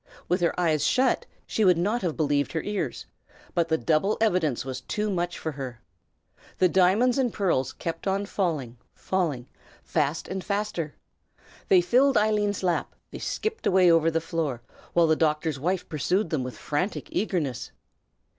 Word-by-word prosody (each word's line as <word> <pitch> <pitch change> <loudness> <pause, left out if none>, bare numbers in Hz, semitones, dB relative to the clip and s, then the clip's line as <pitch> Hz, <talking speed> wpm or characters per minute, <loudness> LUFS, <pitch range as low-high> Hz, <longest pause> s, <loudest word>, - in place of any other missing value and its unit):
With 180 +1 +1
her 170 +1 +1
eyes 155 -4 +2
shut, 255 +10 +2 0.2
she 220 - 0
would 180 -3 +5
not 210 +8 0
have 175 -5 -2
believed 145 -2 +1
her 160 - -1
ears; 205 -1 -3 0.5
but 170 -2 +1
the 160 -1 +2
double 165 +7 +1
evidence 175 - +1
was 130 -1 -5
too 210 +10 -2
much 175 -1 -2
for 160 - -3
her. 130 -5 -7 0.8
The 185 - +5
diamonds 195 +9 +3
and 250 -3 +1
pearls 135 -12 0
kept 165 +2 -5
on 195 +1 0
falling, 155 - -2 0.2
falling, 155 -10 -2 0.4
fast 155 0 -1
and 190 -1 -4
faster. 200 -6 -2 0.7
They 185 -2 +6
filled 260 +9 +3
Eileen's 210 -2 +1
lap, 175 -2 0 0.2
they - - -7
skipped 445 +1 -3
away 185 -2 +5
over 165 -1 +4
the 165 0 0
floor, 155 -7 -3 0.3
while 170 -1 +5
the 160 -1 +3
doctor's 155 -2 0
wife 180 +5 -1
pursued 170 +5 0
them 150 -5 0
with 125 -4 -6
frantic 155 +8 -2
eagerness. 165 - -2
175 Hz, 165 wpm, -26 LUFS, 155-200 Hz, 0.8 s, They